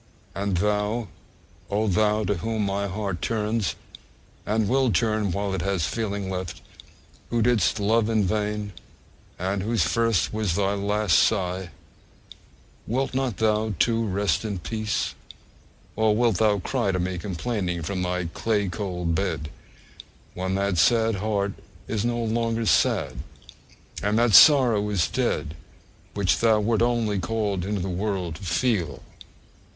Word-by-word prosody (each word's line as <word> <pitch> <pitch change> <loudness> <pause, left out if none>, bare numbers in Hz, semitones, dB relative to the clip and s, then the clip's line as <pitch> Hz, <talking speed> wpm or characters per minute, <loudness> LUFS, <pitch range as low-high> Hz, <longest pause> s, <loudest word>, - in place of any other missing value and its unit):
And 100 -1 -1
thou, 105 +3 0 0.6
oh! 105 +2 0
thou, 105 +3 +2
to 105 -1 0
whom 110 +4 -2
my 100 +1 -1
heart 95 -3 -4
turns, 110 0 -1 0.7
and 110 0 +1
will 130 0 +2
turn 110 +1 +1
while 100 +2 -2
it 95 - -2
has 95 -3 0
feeling 100 +2 -3
left, 90 -4 -4 0.7
who 120 -1 +1
didst 115 -3 +2
love 110 +2 +2
in 110 -2 +2
vain, 105 +1 -2 0.6
and 95 +2 -2
whose 110 -1 +1
first 115 +5 +1
was 105 -6 -1
thy 100 +1 +1
last 105 -1 +2
sigh, 95 -3 0 1.2
wilt 130 +4 -1
not 130 -5 -1
thou 110 -1 +1
too 115 +6 +2
rest 100 -4 0
in 105 -3 -3
peace 110 +3 -2 0.8
(or 110 -1 +2
wilt 115 -4 +2
thou 105 -1 +3
cry 105 +1 -1
to 90 - -1
me 90 0 -2
complaining 90 -2 -3
from 95 +2 -3
thy 90 0 -1
clay 105 +4 -1
cold 90 -2 -3
bed) 80 -4 -2 0.8
when 95 +1 -2
that 100 -3 0
sad 115 +3 +4
heart 100 -1 -1 0.3
is 110 -2 -1
no 120 0 0
longer 115 0 -1
sad, 95 - +2 0.8
and 105 +1 +1
that 120 -2 +3
sorrow 120 -9 +7
is 100 -5 +1
dead 75 - -1 0.6
which 95 -5 +2
thou 110 -2 +4
wert 110 +1 +1
only 115 -4 +1
called 105 -3 -1
into 100 0 -2
the 90 - -3
world 95 -2 -2
to - - -16
feel! 85 - -1
105 Hz, 145 wpm, -25 LUFS, 95-110 Hz, 1.2 s, sorrow